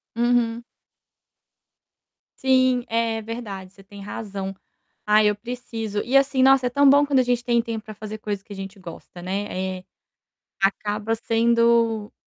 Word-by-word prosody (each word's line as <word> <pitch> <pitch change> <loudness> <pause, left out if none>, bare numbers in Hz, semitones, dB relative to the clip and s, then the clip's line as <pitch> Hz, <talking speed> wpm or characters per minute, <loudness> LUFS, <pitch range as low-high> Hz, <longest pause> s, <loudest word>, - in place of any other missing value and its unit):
Uhum. 235 -1 +1 1.8
Sim, 255 -1 +3
é 230 -1 0
verdade, 210 -4 -7
você 195 0 -18
tem 200 +1 -12
razão. 195 -2 -5 0.5
Ah 210 0 +5
eu 210 0 +3
preciso. 225 -2 -5
E 255 +3 -2
assim, 275 -1 +2
nossa, 265 -1 +5
é - - -1
tão 280 +2 +4
bom 285 +1 +6
quando 280 -2 +2
a 255 - +4
gente 245 -1 0
tem 240 -1 +2
tempo 225 -2 -5
para 215 - -8
fazer 215 +1 -7
coisa 205 -2 -4
que 205 - -11
a - - -8
gente 195 +1 -8
gosta, 175 0 -11
né, 190 0 -3
eh, - - -17 0.8
acaba 210 +3 0
sendo 230 -1 +2
225 Hz, 155 wpm, -23 LUFS, 205-245 Hz, 1.8 s, bom